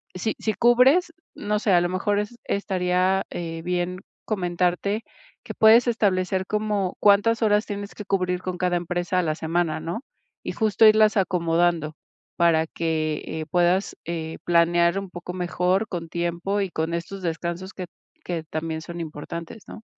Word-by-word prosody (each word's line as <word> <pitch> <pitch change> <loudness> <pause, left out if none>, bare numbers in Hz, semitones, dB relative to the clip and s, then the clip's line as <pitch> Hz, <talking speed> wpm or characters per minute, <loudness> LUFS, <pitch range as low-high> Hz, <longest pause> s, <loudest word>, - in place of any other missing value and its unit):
si 210 +4 -2
si 215 - -1
cubres, 260 +10 +4 0.2
no 210 0 -1
sé, 210 - +1
a 175 - +5
lo 175 - 0
mejor 205 +3 0
es 210 +3 -5
estaría, 185 -1 +1
eh, 165 -1 -5
bien 180 +1 -2 0.2
comentarte 180 +2 -1 0.4
que - - -7
puedes 225 +3 +6
establecer 190 -4 +1
como 210 -3 -1
cuántas 210 +3 +4
horas 210 0 +3
tienes 205 -1 -6
que 210 - -8
cubrir 180 -2 0
con 185 -1 -4
cada 180 0 0
empresa 175 +1 -2
a - - +1
la 155 -2 0
semana, 160 -1 -1
¿no?, 170 +8 -4 0.4
y - - -2
justo 220 0 +3
irlas 215 0 +5
acomodando 170 -4 +1 0.4
para 165 -2 +3
que, 155 -2 -2
eh, 160 0 -5
puedas, 180 +3 +2
eh, 160 -1 -4
planear 170 +1 +3
un 195 - -7
poco 175 0 -7
mejor 180 +3 0
con 170 -4 -5
tiempo 175 +4 -1
y 195 - -1
con 160 +1 -2
estos 190 +3 -6
descansos 170 +3 -4
que 185 - -6 0.4
que 170 -3 -3
también 160 +1 -4
son 170 +1 -8
importantes, 165 +5 -7
¿no? 220 - -10
180 Hz, 160 wpm, -24 LUFS, 170-205 Hz, 0.4 s, puedes